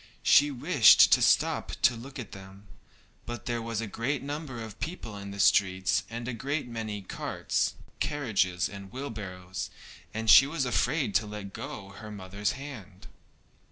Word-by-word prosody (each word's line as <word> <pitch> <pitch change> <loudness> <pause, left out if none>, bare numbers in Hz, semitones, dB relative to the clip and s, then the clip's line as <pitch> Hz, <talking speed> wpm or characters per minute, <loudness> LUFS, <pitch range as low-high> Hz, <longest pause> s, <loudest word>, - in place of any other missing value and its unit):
She 145 +1 +6
wished 130 -4 +6
to - - +6
stop - - +2
to 120 - +5
look 135 +4 -9
at 120 -6 -7
them, 95 +1 -12 0.6
but 120 -2 -6
there 120 -1 -2
was 115 -1 -3
a - - -3
great 125 +7 -2
number 145 -3 -5
of 110 -2 -8
people 155 - -5
in 100 0 -7
the 100 0 -8
streets, 95 -1 +3
and 120 +1 -6
a 125 - -2
great 140 +4 -3
many 110 -4 -5
carts, - - -2 0.2
carriages, 95 - 0
and 100 -1 -10
wheelbarrows, 100 -8 -6 0.4
and 110 +1 -4
she 135 +5 +9
was 145 -2 -1
afraid 125 0 0
to 105 +3 +2
let 105 -2 -7
go 100 -2 -7
her 105 +2 -10
mother's 100 +2 -3
hand. 120 -9 -10
110 Hz, 160 wpm, -28 LUFS, 100-130 Hz, 0.6 s, she